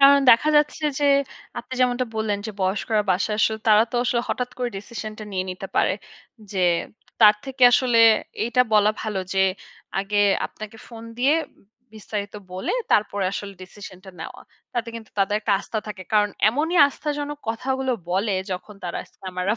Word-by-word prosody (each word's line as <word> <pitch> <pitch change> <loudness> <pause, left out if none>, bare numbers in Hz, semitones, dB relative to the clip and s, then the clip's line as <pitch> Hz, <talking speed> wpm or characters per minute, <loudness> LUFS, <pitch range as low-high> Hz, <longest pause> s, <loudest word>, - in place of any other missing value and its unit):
কারণ 280 0 +8
দেখা 250 +7 +5
যাচ্ছে 295 +1 +1 0.2
যে, - - +2 0.5
আপনি 245 +2 -10
যেমনটা 250 0 +2
বললেন, 215 -2 -1
যে - - -4
বয়স্করা 210 +3 +1
বাসায় 200 +4 0
আসলে 220 0 +2
তারা 215 0 +7
তো - - -1
আসলে 240 -1 +1
হঠাৎ 250 0 -2
করে 245 - -1
ডিসিশন 215 +1 -7
টা 215 - -7
নিয়ে 185 -1 -1
নিতে 185 +1 -6
পারে। - - +3 0.6
যে 190 - -1 0.6
তার 210 -1 +8
থেকে 265 -1 -6
আসলে 245 -2 +3 0.5
এইটা 240 +2 +3
বলা 210 0 +5
ভালো 215 -3 -3 0.2
যে 190 - +2 0.6
আগে 200 +1 -2 0.3
আপনাকে 215 +1 -10
ফোন 230 -1 -10
দিয়ে 270 +5 +4 0.6
বিস্তারিত 205 -1 -5 0.2
বলে 185 - -3 0.2
তারপরে 205 -2 +2
আসলে 200 0 -5
ডিসিশন 185 0 -11
টা 190 - -10
নেওয়া। - - -8 0.3
তাতে 235 -1 -2
কিন্তু 225 -1 -9
তাদের 195 +1 +2
একটা 210 -1 0
আস্থা 220 - -4
থাকে। 205 -3 -7
কারণ 210 -1 +3 0.2
এমনই 310 +9 0
আস্থাজনক 295 0 -4
কথাগুলো 260 +3 -1 0.2
বলে 195 +4 0 0.2
যখন 195 +3 -7
তারা 175 - -3
স্ক্যামাররা 185 +3 -3
215 Hz, 165 wpm, -23 LUFS, 200-250 Hz, 0.6 s, কারণ